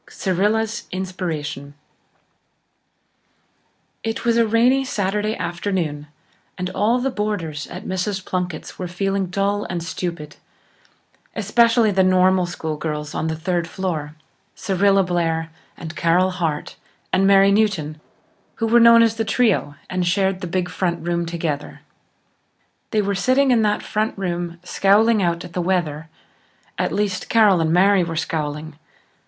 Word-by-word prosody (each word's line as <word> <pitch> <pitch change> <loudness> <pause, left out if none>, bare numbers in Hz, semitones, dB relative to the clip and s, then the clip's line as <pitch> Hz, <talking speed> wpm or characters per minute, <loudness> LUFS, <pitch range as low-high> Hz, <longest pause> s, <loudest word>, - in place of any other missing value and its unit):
Cyrilla's 215 +4 -1
Inspiration 160 -6 -4 2.3
It 225 +1 -3
was 235 -1 +3
a 230 -1 +3
rainy 245 +5 +3
Saturday 210 -2 -1
afternoon 175 -5 -3 0.5
and 180 0 -3
all 225 +4 +2
the 265 +2 -1
boarders 190 -10 -3
at - - -9
Mrs. 190 +1 -3
Plunkett's 180 -3 -4
were 180 - -3
feeling 195 +2 -1
dull 200 +2 -1
and 175 -2 -4
stupid, 165 -3 -5 1.0
especially 230 +1 +3
the 190 -1 +2
Normal 185 -1 +3
School 160 -3 -4
girls 150 -1 -4
on 160 - -2
the 160 - -2
third 170 +1 -2
floor, 165 -5 -4 0.4
Cyrilla 195 0 +2
Blair 165 -2 -1 0.3
and 165 -1 -8
Carol 180 +3 +2
Hart 165 -5 -3 0.4
and 195 +1 +3
Mary 195 0 +6
Newton, 180 -8 0 0.5
who 225 - -2
were 235 +2 +5
known 230 0 +7
as 225 -1 +1
The 225 - 0
Trio, 220 -10 +1
and 180 -1 -1
shared 190 +1 +1
the 180 - -4
big 180 +1 -1
front 170 -3 -2
room 170 -1 -1
together. 160 -4 -4 1.1
They 215 -1 +1
were 200 0 -1
sitting 255 +7 +2
in 235 -2 +4
that 210 -1 +1
front 215 +1 -2
room, 175 -2 -3
scowling 205 +4 +3
out 170 -1 -1
at 175 - -12
the 180 - -1
weather. 165 -4 -1 0.7
At - - 0
least, 200 -3 -2
Carol 210 -6 +5
and 160 0 +1
Mary 190 +2 +4
were 165 -1 -4
scowling. 155 -1 -4
185 Hz, 140 wpm, -21 LUFS, 170-210 Hz, 2.3 s, known